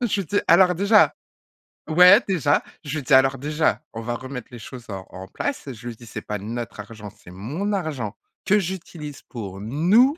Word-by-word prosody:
J'étais 205 Hz, -4 st, 0 dB
alors 180 Hz, +1 st, +6 dB
déjà 200 Hz, +4 st, +4 dB, 0.8 s
ouais, 180 Hz, +7 st, +8 dB
déjà, 160 Hz, -7 st, +2 dB, 0.2 s
je 150 Hz, 0 st, -4 dB
lui 145 Hz, -, -4 dB
dis: 135 Hz, -, 0 dB
«Alors 135 Hz, +1 st, +5 dB
déjà, 150 Hz, +4 st, 0 dB
on 115 Hz, -, -5 dB
va 120 Hz, +1 st, -3 dB
remettre 130 Hz, 0 st, -7 dB
les 120 Hz, -, -9 dB
choses 120 Hz, +2 st, -10 dB
en 95 Hz, -1 st, -6 dB
en 95 Hz, 0 st, -9 dB
place». 265 Hz, -, -4 dB
Je 115 Hz, +2 st, -10 dB
lui 115 Hz, -, -7 dB
dis: 120 Hz, -, -14 dB
«C'est -, -, -6 dB
pas 105 Hz, 0 st, -4 dB
notre 115 Hz, +2 st, -6 dB
argent, 105 Hz, 0 st, -9 dB
c'est 105 Hz, -4 st, -17 dB
mon 140 Hz, -, -4 dB
argent 140 Hz, -, -3 dB, 0.3 s
que 210 Hz, +2 st, +4 dB
j'utilise 170 Hz, -6 st, -5 dB
pour 100 Hz, -5 st, -7 dB
nous, 185 Hz, -, +3 dB
140 Hz, 190 wpm, -23 LUFS, 115-180 Hz, 0.8 s, ouais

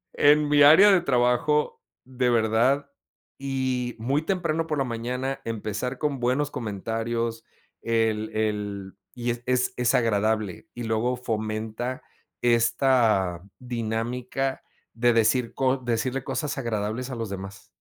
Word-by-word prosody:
En 150 Hz, +1 st, +5 dB
mi 145 Hz, 0 st, +4 dB
área 160 Hz, +8 st, +8 dB
de 185 Hz, -, +4 dB
trabajo, 125 Hz, +1 st, +1 dB, 0.2 s
de 125 Hz, -1 st, -1 dB
verdad, 120 Hz, -, +2 dB, 0.5 s
y 130 Hz, -3 st, -2 dB
muy 135 Hz, +6 st, 0 dB
temprano 165 Hz, -2 st, -1 dB
por 150 Hz, -, -1 dB
la 135 Hz, -, +1 dB
mañana 125 Hz, +2 st, -3 dB
empezar 115 Hz, +3 st, -4 dB
con 145 Hz, -3 st, -2 dB
buenos 130 Hz, +4 st, 0 dB
comentarios, 115 Hz, 0 st, -3 dB, 0.4 s
el 110 Hz, -1 st, 0 dB
el 105 Hz, -3 st, -2 dB, 0.2 s
y 120 Hz, -1 st, -1 dB
es 120 Hz, 0 st, -5 dB
es 125 Hz, 0 st, +1 dB
es 125 Hz, 0 st, +1 dB
agradable 110 Hz, -, 0 dB
y 120 Hz, -, -5 dB
luego 115 Hz, +3 st, 0 dB
fomenta 110 Hz, +1 st, -3 dB, 0.4 s
esta 115 Hz, -6 st, +2 dB, 0.2 s
dinámica, 125 Hz, +2 st, -3 dB, 0.3 s
de 120 Hz, +1 st, +2 dB
decir 115 Hz, +1 st, +2 dB
co 135 Hz, 0 st, +2 dB
decirle 125 Hz, +1 st, -2 dB
cosas 150 Hz, -3 st, -3 dB
agradables 115 Hz, +2 st, -3 dB
a 130 Hz, -, -5 dB
los 115 Hz, -3 st, -4 dB
demás. 95 Hz, 0 st, -8 dB
120 Hz, 130 wpm, -25 LUFS, 110-130 Hz, 0.5 s, área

